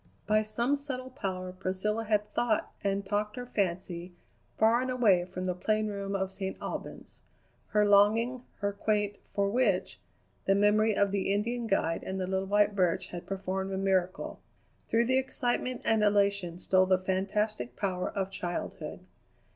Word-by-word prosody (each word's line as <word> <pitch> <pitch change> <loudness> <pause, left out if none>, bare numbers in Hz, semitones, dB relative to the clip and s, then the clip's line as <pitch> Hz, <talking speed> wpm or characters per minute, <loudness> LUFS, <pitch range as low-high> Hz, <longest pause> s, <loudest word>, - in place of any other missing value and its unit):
By 215 0 +3
some 235 +6 0
subtle 260 -2 -6
power 185 -8 -4
Priscilla 190 +4 -2
had 210 -1 0
thought 230 -3 +1
and 200 0 0
talked 210 +1 -1
her 250 - -5
fancy 180 -4 -2 0.4
far 225 +2 +4
and 260 - -2
away 210 -9 +4
from 185 0 -5
the 180 - 0
plain 215 +4 0
room 200 -1 -3
of 190 -1 -2
St. 190 -1 -4
Albans. - - -7 0.5
Her 210 0 +3
longing, 220 +5 +4 0.2
her 200 0 0
quaint 205 0 0 0.2
"for 200 -1 +2
which?" 205 -4 +1 0.5
the 195 - +4
memory 210 +1 +4
of 200 -1 +3
the 195 -1 0
Indian 230 +4 -1
guide 165 -5 +1
and 190 0 -4
the 185 - -1
little 190 +1 -1
white 205 +1 +3
birch 180 -4 +1
had 175 -1 -7
performed 190 0 -3
a - - -1
miracle. 190 -2 0 0.5
Through 230 +1 +3
the 260 +2 +3
excitement 255 -1 -2
and 220 -1 +3
elation 200 -4 +2
stole 185 +1 +3
the 185 0 +4
fantastic 190 - -1
power 185 -3 -1
of 195 -1 -3
childhood. 175 -2 -5
200 Hz, 165 wpm, -30 LUFS, 190-215 Hz, 0.5 s, far